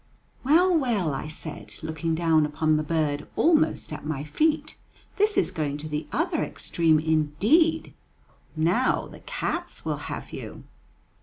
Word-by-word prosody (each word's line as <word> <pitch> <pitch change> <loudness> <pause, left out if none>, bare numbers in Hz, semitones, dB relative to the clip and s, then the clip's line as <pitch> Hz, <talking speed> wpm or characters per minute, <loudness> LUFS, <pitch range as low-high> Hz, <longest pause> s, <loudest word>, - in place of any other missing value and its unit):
"Well, 345 +7 +4
well," 225 - +1
I 135 - -4
said, 155 0 -7
looking 160 +1 -2
down 160 -2 +3
upon 155 +1 +1
the 155 - +1
bird 155 -2 -1
almost 315 - +2
at 150 - -7
my 150 -2 -3
feet, 305 - 0 0.4
"this 420 0 +2
is - - +2
going 150 -5 -2
to 150 +1 -6
the 150 0 -4
other 325 0 0
extreme 160 -2 +1
indeed; 160 - +2 0.6
now 175 +11 +2
the - - -12
cats - - -4
will - - -1
have - - -6
you." - - -8
160 Hz, 145 wpm, -26 LUFS, -, 0.6 s, Well